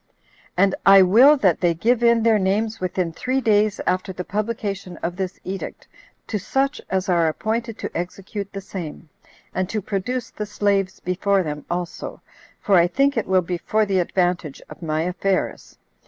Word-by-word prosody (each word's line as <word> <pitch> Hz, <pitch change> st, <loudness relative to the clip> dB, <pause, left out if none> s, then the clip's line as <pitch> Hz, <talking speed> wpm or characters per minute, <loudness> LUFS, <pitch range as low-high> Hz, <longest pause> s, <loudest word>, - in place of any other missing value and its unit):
And 195 Hz, +1 st, +4 dB
I 195 Hz, -1 st, +8 dB
will 245 Hz, +11 st, +7 dB
that 190 Hz, -, +2 dB
they 175 Hz, -2 st, +2 dB
give 235 Hz, +7 st, +2 dB
in 235 Hz, -1 st, +4 dB
their 225 Hz, -2 st, +4 dB
names 215 Hz, +4 st, 0 dB
within 180 Hz, -2 st, -2 dB
three 255 Hz, +9 st, -1 dB
days 215 Hz, -3 st, +2 dB
after 185 Hz, +1 st, 0 dB
the 180 Hz, 0 st, -5 dB
publication 200 Hz, -3 st, -3 dB
of 175 Hz, +1 st, -2 dB
this 185 Hz, -1 st, -4 dB
edict, 190 Hz, +1 st, -6 dB, 0.4 s
to 210 Hz, -, -3 dB
such 270 Hz, +8 st, -1 dB
as 190 Hz, 0 st, -1 dB
are 170 Hz, -3 st, +3 dB
appointed 225 Hz, +7 st, -2 dB
to -, -, -6 dB
execute 195 Hz, +3 st, -5 dB
the 195 Hz, -, -6 dB
same, 170 Hz, -4 st, -7 dB, 0.4 s
and 185 Hz, 0 st, -1 dB
to 215 Hz, -, -1 dB
produce 220 Hz, +5 st, -3 dB
the 210 Hz, -, -5 dB
slaves 200 Hz, -2 st, 0 dB
before 190 Hz, +2 st, +1 dB
them 150 Hz, -2 st, -5 dB
also, 175 Hz, -1 st, -4 dB, 0.4 s
for 195 Hz, -3 st, +3 dB
I 170 Hz, 0 st, +5 dB
think 275 Hz, +8 st, +2 dB
it 225 Hz, -, -1 dB
will 185 Hz, -1 st, +3 dB
be 175 Hz, 0 st, -3 dB
for 215 Hz, +4 st, +1 dB
the 195 Hz, -2 st, +1 dB
advantage 175 Hz, -4 st, 0 dB
of -, -, -11 dB
my 155 Hz, -1 st, -1 dB
affairs. 185 Hz, +2 st, -2 dB
195 Hz, 175 wpm, -22 LUFS, 180-215 Hz, 0.4 s, I